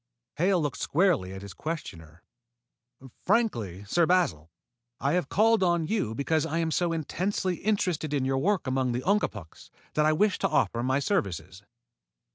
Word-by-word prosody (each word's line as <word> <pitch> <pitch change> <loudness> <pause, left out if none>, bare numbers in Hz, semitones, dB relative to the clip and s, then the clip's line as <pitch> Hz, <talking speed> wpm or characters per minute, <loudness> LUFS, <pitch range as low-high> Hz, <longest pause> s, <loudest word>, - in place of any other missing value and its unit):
Hale 180 +3 +3
looked 145 -8 -2
squarely 160 - +1
at 95 +1 -8
his 100 - -9
questioner. 90 - -7 1.0
"Frankly, 115 - 0
Sir 165 +10 +2
Basil, 165 - +1 0.5
I 140 - 0
have 180 0 0
called 225 +1 +3
on 175 -3 +2
you 155 - -1
because 155 +4 0
I 160 0 -2
am 165 -1 0
so 175 +1 +1
intensely 180 +3 -2
interested 180 -7 -1
in 140 -3 0
your 135 0 +1
work 190 +4 +1
among 130 -1 0
the 125 +2 -3
Ungapuks 110 - -2 0.2
that 150 0 +2
I 155 - +4
wish 205 +4 +2
to - - +1
offer 115 - +1
my 130 +2 +1
services." 95 - -2
155 Hz, 160 wpm, -27 LUFS, 115-180 Hz, 1.0 s, I